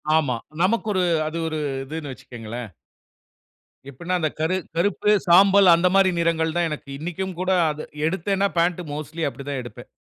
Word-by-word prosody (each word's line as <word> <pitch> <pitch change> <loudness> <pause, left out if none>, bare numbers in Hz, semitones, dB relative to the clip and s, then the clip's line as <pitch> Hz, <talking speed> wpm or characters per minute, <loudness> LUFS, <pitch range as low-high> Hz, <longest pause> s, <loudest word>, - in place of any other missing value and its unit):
ஆமா, 140 -6 +2 0.3
நமக்கு 220 +5 +1
ஒரு 185 -1 +1 0.2
அது 155 +2 -4
ஒரு, 155 -1 -3 0.3
இதுன்னு 150 -1 -6
வைச்சுக்கோங்களேன். 120 -2 -8 1.2
எப்டினா 175 +7 -5
அந்த 155 -2 0
கரு 160 +4 +1 0.2
கருப்பு 205 +3 +1 0.2
சாம்பல், 195 +2 +6
அந்த 170 +2 +2
மாரி 195 -1 +5
நிறங்கள் 165 -1 +1
தான் 170 -1 +2
எனக்கு 150 -2 -7
இன்னைக்கும் 180 +3 -4
கூட 185 +1 0 0.2
அது 150 +1 -7 0.2
எடுத்தேனா 195 +3 0
பாண்ட் 175 +1 +1
மோஸ்ட்லி 155 +2 -5
அப்படி 140 +1 -10
தான் 140 - -2
எடுப்பேன். 120 - -11
165 Hz, 155 wpm, -23 LUFS, 150-185 Hz, 1.2 s, சாம்பல்